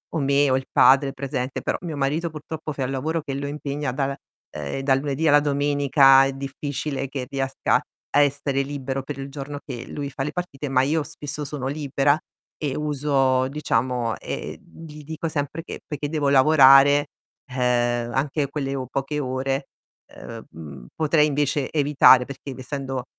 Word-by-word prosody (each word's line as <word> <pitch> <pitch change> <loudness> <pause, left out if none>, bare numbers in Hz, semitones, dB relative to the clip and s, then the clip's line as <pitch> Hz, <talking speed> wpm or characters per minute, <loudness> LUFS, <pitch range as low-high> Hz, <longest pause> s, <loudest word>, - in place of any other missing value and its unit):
o - - +1
me 140 0 +3
o 130 - +3
il 130 0 -2
padre 135 +1 +5
presente, 130 -1 -4
però, - - -1
mio 165 -4 -5
marito, 150 +5 0
purtroppo 155 0 -6
fa 135 -1 -3
un 130 - -1
lavoro 155 +5 -2
che 140 - -5
lo 140 +1 -3
impegna 145 -1 -3
da 135 +2 -1
la 135 0 -3 0.4
ehm, 75 - -5
dal 135 -1 +2
lunedì 145 +3 -1
alla 145 0 +6
domenica, 140 -2 +4
è 135 - 0
difficile 140 0 -4
che 135 -2 -4
riesca 135 -1 0 0.3
a - - +6
essere 140 -1 +1
libero 135 -1 -4
per 140 +1 -7
il 135 - -6
giorno 145 0 -6
che 125 -4 -7
lui 140 -1 -5
fa 135 - -6
le 150 - -2
partite, 150 -6 -5
ma 130 -1 +3
io 155 +3 +1
spesso 145 0 -6
sono 140 -2 -5
libera 140 0 +1 0.4
e 145 -3 -2
uso, 135 -3 +1
diciamo 125 -5 -1
e - - -5
e, - - -15
mhmm, 165 - -14
gli 150 -1 -11
dico 160 +2 -5
sempre 155 +1 -3
che - - -8
perché 145 -1 -4
devo 150 -2 0
lavorare, 140 0 +6 0.4
ehm, 120 -2 0
anche 140 +1 -1
quelle 140 -1 -3
o 130 -1 -3
poche 140 +3 -3
ore, 135 +1 -2 0.5
ehm, 115 -1 -10
mhmm, 70 -6 -11
potrei 155 -1 +3
invece 145 -1 0
evitare, 140 -4 +5
perché 140 0 -8
essendo, 130 0 -5
140 Hz, 180 wpm, -23 LUFS, 135-145 Hz, 0.5 s, alla